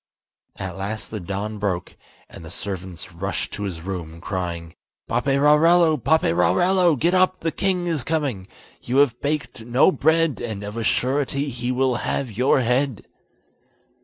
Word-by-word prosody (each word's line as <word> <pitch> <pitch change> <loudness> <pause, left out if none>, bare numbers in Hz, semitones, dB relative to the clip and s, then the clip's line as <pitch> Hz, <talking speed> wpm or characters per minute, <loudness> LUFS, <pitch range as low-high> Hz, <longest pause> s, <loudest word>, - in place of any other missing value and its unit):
At 95 -2 -6
last 100 +3 -5
the 110 - -4
dawn 100 +4 -4
broke, 95 -3 -2 0.3
and - - -12
the 80 - -9
servants 90 -2 -6
rushed 95 +3 -4
to 100 - -6
his 85 -4 -5
room, 85 -3 -6
crying: 85 -3 -4 0.3
"Paperarello! 150 +7 +4
Paperarello! 160 - +3
get 170 +7 +1
up, 185 0 +3
the 165 - 0
king 180 +2 0
is 160 -7 -1
coming. 135 -11 -2 0.3
You 125 +2 -1
have 140 -4 +3
baked 145 -5 -3
no 120 +9 +4
bread, 160 -3 +2
and 110 -4 -4
of 105 +1 -6
a 115 - -2
surety 140 +7 0
he 120 0 -3
will 130 -1 +1
have 130 -1 -2
your 125 +5 +2
head." 125 0 0
120 Hz, 150 wpm, -23 LUFS, 95-150 Hz, 0.3 s, Paperarello